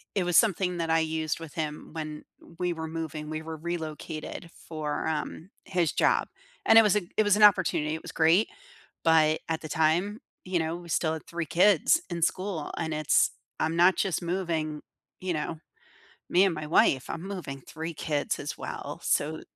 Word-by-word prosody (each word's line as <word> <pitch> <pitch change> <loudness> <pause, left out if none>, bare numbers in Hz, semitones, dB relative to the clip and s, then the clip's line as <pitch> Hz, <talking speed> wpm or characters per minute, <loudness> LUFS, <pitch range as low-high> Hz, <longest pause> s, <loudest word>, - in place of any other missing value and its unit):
it 195 - +2
was 175 -1 +3
something 185 -4 +3
that 165 -1 -2
I 165 0 +4
used 160 -1 -1
with 165 -3 -9
him 150 -2 -4
when 155 -1 -6 0.3
we 180 0 0
were 160 -1 -5
moving. 155 -2 -5
We 155 0 -4
were 160 0 -6
relocated 160 0 -5
for, 155 -2 -4
um, 160 +2 -3 0.2
his 175 -5 +1
job, - - +2 0.4
and 225 - +8
it - - +9
was 210 -3 +3
a 210 - +2 0.2
it 215 - +5
was 205 -1 +4
an 210 - +3
opportunity. 180 -6 +4
It 160 - -7
was - - -8
great. 165 +6 +4 0.6
But 160 -1 +4
at 160 -1 -1
the 155 - -7
time, 170 +8 +1 0.2
you 185 -1 0
know, 160 +1 -2
we 175 -1 -12
still 160 0 +1
had 160 - -7
3 170 0 -3
kids 195 - +4
in 170 -1 -4
school, 185 -2 -1
and 160 -2 -2
it's 155 -1 +3 0.3
"I'm 160 +1 0
not 180 +2 +5
just 190 -4 0
moving," 165 -4 -2 0.4
you 185 -1 -1
know, 155 +1 -3 0.7
"me 185 +2 +5
and 190 -4 +2
my 155 -1 -5
wife. 135 -4 +3
I'm 165 - -4
moving 180 -9 -6
3 160 +4 -6
kids 145 -1 -1
as - - -5
well." - - -6
So, 155 +2 0
165 Hz, 190 wpm, -28 LUFS, 155-180 Hz, 0.7 s, it